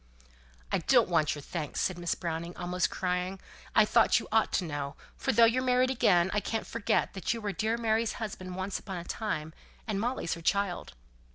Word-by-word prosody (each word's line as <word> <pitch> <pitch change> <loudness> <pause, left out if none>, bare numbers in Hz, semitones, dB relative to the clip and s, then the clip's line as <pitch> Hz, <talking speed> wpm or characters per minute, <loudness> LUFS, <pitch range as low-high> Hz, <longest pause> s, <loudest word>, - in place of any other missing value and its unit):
"I - - +2
don't 235 +4 +4
want 160 -4 +2
your 145 - -8
thanks," 155 -4 -4
said 185 -2 0
Miss 175 -1 -1
Browning, 170 0 -4
almost 180 0 0
crying. 180 +1 -2 0.4
"I - - +7
thought - - +4
you - - -8
ought - - +3
to - - +2
know; 145 -2 -4 0.2
for - - 0
though 230 +1 +7
you're 235 +3 +3
married 255 0 +3
again, 190 -8 +3
I 210 - +2
can't 225 +1 -3
forget 200 -3 0
you 230 - -1
were 210 -2 -2
dear 220 +3 0
Mary's 225 -1 +1
husband 185 -4 -6
once 190 +1 -3
upon 190 -3 -6
a 170 - -5
time; 160 -6 -3 0.3
and 210 -3 -2
Molly's 240 -7 -1
her 170 - -7
child." 195 - 0
190 Hz, 195 wpm, -30 LUFS, 175-225 Hz, 0.4 s, I